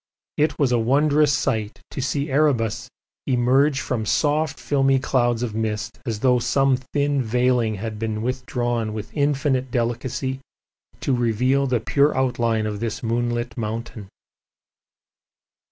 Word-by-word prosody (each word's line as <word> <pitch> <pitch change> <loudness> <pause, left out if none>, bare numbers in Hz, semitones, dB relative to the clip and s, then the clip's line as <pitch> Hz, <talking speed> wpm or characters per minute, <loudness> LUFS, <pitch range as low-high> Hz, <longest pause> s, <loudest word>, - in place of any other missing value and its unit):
It 150 +1 +1
was 140 -5 +2
a 120 - +3
wondrous 145 +5 +3
sight 110 -6 -1
to 135 - -4
see 140 +2 -2
Erebus 120 -5 +1 0.4
emerge 135 +3 +3
from 115 -4 -2
soft 150 +2 +1
filmy 135 -1 +2
clouds 120 -3 +1
of 115 -3 -3
mist 110 +1 -3
as 110 -2 -3
though 125 -2 +4
some 130 +3 +2
thin 140 +2 -1
veiling 120 -1 +1
had 110 +1 -5
been 110 -1 -2
withdrawn 120 -3 -2
with 110 0 -7
infinite 140 -3 +1
delicacy 120 +2 -2 0.6
to 135 - +1
reveal 125 +4 +1
the 125 -2 +1
pure 140 +6 +2
outline 115 -4 +1
of 105 -1 -3
this 115 +1 -4
moonlit 120 0 -1
mountain. 110 -2 -5
125 Hz, 135 wpm, -23 LUFS, 115-135 Hz, 0.6 s, though